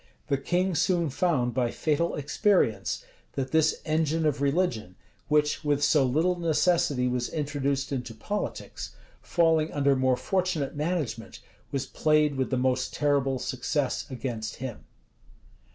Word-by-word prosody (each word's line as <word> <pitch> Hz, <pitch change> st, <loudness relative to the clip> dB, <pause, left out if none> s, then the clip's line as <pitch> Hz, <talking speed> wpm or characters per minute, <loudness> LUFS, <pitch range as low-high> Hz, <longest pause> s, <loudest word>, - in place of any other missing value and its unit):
The 140 Hz, -, +2 dB
king 180 Hz, +6 st, 0 dB
soon 170 Hz, -1 st, +1 dB
found 130 Hz, -7 st, +1 dB
by 125 Hz, -2 st, +1 dB
fatal 155 Hz, +6 st, 0 dB
experience, 145 Hz, -, +1 dB, 0.3 s
that 130 Hz, -1 st, -3 dB
this 160 Hz, 0 st, +2 dB
engine 160 Hz, 0 st, +1 dB
of 145 Hz, -2 st, +1 dB
religion, 140 Hz, -, 0 dB, 0.3 s
which 150 Hz, -1 st, +2 dB
with 145 Hz, -1 st, +1 dB
so 145 Hz, -1 st, +4 dB
little 160 Hz, +8 st, +1 dB
necessity 155 Hz, -5 st, +2 dB
was 125 Hz, -1 st, -1 dB
introduced 140 Hz, -2 st, -2 dB
into 125 Hz, -4 st, -4 dB
politics, 205 Hz, -, -5 dB, 0.3 s
falling 165 Hz, -2 st, +2 dB
under 140 Hz, -1 st, +2 dB
more 130 Hz, -1 st, +2 dB
fortunate 180 Hz, -8 st, -1 dB
management, 145 Hz, -8 st, -3 dB, 0.3 s
was 135 Hz, -2 st, -1 dB
played 150 Hz, -1 st, +2 dB
with 130 Hz, -1 st, -1 dB
the 130 Hz, -, 0 dB
most 130 Hz, 0 st, 0 dB
terrible 140 Hz, -2 st, +1 dB
success 130 Hz, +2 st, -2 dB
against 120 Hz, -4 st, -4 dB
him. 130 Hz, -3 st, -7 dB
145 Hz, 135 wpm, -27 LUFS, 130-160 Hz, 0.3 s, so